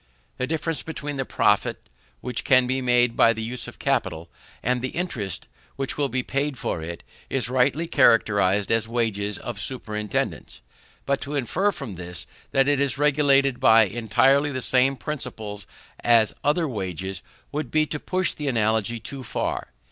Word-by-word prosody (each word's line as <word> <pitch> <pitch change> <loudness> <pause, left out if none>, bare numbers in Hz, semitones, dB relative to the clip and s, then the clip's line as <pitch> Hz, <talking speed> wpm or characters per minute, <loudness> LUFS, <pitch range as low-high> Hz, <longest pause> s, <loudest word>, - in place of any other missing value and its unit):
The 125 - -1
difference 160 -1 -1
between 145 -2 -5
the 135 - -1
profit - - +1 0.3
which 125 -1 -3
can 130 -2 +5
be 130 +1 -1
made 120 -1 +3
by 115 - +5
the 110 0 -5
use 120 +2 -4
of 120 - -10
capital, 95 -12 -1 0.3
and 125 +1 +1
the 130 - -1
interest 115 - -3 0.3
which 135 -1 -3
will 145 -2 0
be 130 0 -1
paid 140 +1 -2
for 85 - -3
it, 85 +1 -7 0.3
is 130 -2 0
rightly 135 +6 +2
characterized 105 - +3
as 115 -1 +2
wages 105 -4 -1
of 120 -5 -6
superintendance. 105 - -3 0.4
But 140 0 0
to 145 +1 -4
infer 170 - +1
from 135 - -7
this 90 0 -5 0.2
that 135 0 +3
it 145 -1 +2
is 140 -1 +1
regulated 140 -2 +3
by 110 0 +7
entirely 120 +7 +2
the 130 - -3
same 130 +2 +3
principles 115 -8 -6 0.3
as 115 -2 +4
other 155 +3 +2
wages, 95 - -4 0.3
would 150 +1 -3
be 155 0 +2
to 150 0 -4
push 185 +3 0
the 150 - -5
analogy 110 -2 +1
too 130 +4 -7
far. - - -3
125 Hz, 165 wpm, -24 LUFS, 110-140 Hz, 0.4 s, by